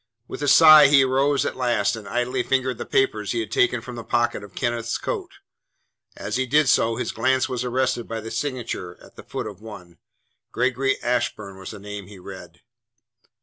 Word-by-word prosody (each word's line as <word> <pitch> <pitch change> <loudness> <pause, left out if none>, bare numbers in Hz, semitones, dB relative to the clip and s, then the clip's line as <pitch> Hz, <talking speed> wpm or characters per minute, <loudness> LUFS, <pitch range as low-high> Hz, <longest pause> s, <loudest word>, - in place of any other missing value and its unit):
With - - -8
a 145 - -1
sigh 155 0 +9
he 140 -1 +5
rose 135 +2 +1
at - - -3
last 120 -3 0
and 110 -3 -10
idly 125 +4 -1
fingered 130 -1 -1
the - - -6
papers 110 -6 0
he 120 - -1
had 110 -2 -5
taken 180 - +2
from 125 -1 -9
the 115 - -6
pocket 120 -3 -1
of 100 -2 -13
Kenneth's 120 -2 -2
coat. - - -5 0.8
As 105 +4 -3
he 130 0 -1
did 150 +3 +3
so 115 -2 +3
his 125 - -3
glance 130 +3 +1
was 125 -2 -3
arrested 125 -1 -1
by 115 0 -4
the 110 +1 -8
signature 120 -10 -4
at - - -18
the - - -11
foot - - -6
of - - -9
one. 90 -7 -12 0.5
"Gregory 130 +2 0
Ashburn" 120 -5 -2
was 95 - -8
the 105 - -8
name 100 -1 -8
he 100 -1 -12
read. 90 -2 -11
120 Hz, 195 wpm, -23 LUFS, 105-130 Hz, 0.8 s, sigh